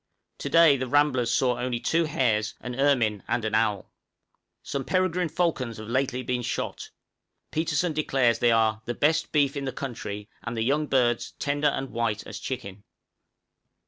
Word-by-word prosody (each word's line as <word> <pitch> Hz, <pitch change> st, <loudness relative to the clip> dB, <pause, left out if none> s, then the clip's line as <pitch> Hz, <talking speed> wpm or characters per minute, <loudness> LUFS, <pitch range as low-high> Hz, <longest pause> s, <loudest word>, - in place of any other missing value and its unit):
To -, -, -4 dB
day 165 Hz, -4 st, +6 dB
the 130 Hz, 0 st, -3 dB
ramblers 130 Hz, -3 st, +2 dB
saw 125 Hz, -1 st, +1 dB
only 125 Hz, -1 st, -1 dB
two 165 Hz, +7 st, +1 dB
hares, 110 Hz, -8 st, 0 dB
an 125 Hz, -, -6 dB
ermine, 120 Hz, -6 st, +2 dB
and 115 Hz, -, -1 dB
an 110 Hz, -, -2 dB
owl. 105 Hz, -3 st, 0 dB, 0.7 s
Some 140 Hz, -, -3 dB
peregrine 180 Hz, +1 st, 0 dB
falcons 150 Hz, -9 st, -1 dB
have 110 Hz, 0 st, -8 dB
lately 130 Hz, 0 st, 0 dB
been 125 Hz, -1 st, -1 dB
shot; 120 Hz, -, -4 dB, 0.6 s
Petersen 160 Hz, +1 st, 0 dB
declares 135 Hz, -6 st, +2 dB
they 120 Hz, -, +4 dB
are 110 Hz, -1 st, +2 dB
"_the 120 Hz, -, -4 dB
best 155 Hz, +1 st, +2 dB
beef 145 Hz, -2 st, +2 dB
in 140 Hz, -1 st, -3 dB
the 135 Hz, -, -2 dB
country, 105 Hz, -7 st, -6 dB
and 115 Hz, 0 st, -5 dB
the 110 Hz, -, +1 dB
young 145 Hz, +5 st, +1 dB
birds 120 Hz, -4 st, +1 dB
tender 145 Hz, +1 st, 0 dB
and 135 Hz, -2 st, -2 dB
white 115 Hz, -2 st, -1 dB
as -, -, -7 dB
chicken! 100 Hz, -6 st, -6 dB
130 Hz, 170 wpm, -26 LUFS, 115-145 Hz, 0.7 s, day